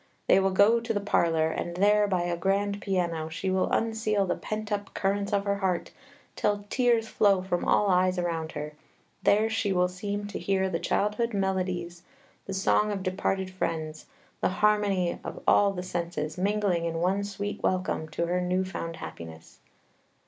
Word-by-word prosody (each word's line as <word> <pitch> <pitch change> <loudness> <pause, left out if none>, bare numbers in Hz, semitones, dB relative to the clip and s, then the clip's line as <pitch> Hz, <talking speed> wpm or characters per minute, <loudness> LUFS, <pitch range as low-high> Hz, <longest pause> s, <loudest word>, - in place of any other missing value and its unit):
They - - +5
will 195 0 +2
go 200 +5 +5
to 230 0 -3
the - - +2
parlor, 165 -5 +2
and 170 +1 -4
there, 205 +2 +4
by 185 -3 0
a 175 0 -1
grand 200 +3 0
piano, 170 -5 -1
she 185 +4 -3
will 185 0 +1
unseal 220 -3 +1
the 180 - 0
pent 215 0 -5
up 205 -1 -3
currents 200 +1 0
of 200 -1 +1
her 200 0 0
heart, 190 -3 -1 0.4
till 205 -1 0
tears 240 -3 +2
flow 195 -4 +3
from 175 -2 -1
all 210 - +3
eyes 185 -1 +3
around 165 -2 -2
her; 150 0 -5 0.5
there 215 +2 +4
she 225 -2 -1
will 180 -1 +3
seem 200 +3 -4
to - - -5
hear 190 -1 0
the 165 - -1
childhood 210 +5 0
melodies, 185 -3 -2 0.5
the 195 - -4
song 210 +2 +2
of 195 -2 -3
departed 190 0 -1
friends, 160 -4 -4 0.3
the - - +1
harmony 200 -2 +1
of - - -6
all 200 -1 +5
the 180 -2 -5
senses, 170 -4 -3
mingling 195 -3 0
in 165 -1 -2
one 185 +4 +1
sweet 205 0 -5
welcome 185 -3 -1
to 165 +2 -2
her 180 +1 0
new 180 +1 0
found 165 -3 -5
happiness. 80 - -10
190 Hz, 180 wpm, -27 LUFS, 175-205 Hz, 0.5 s, They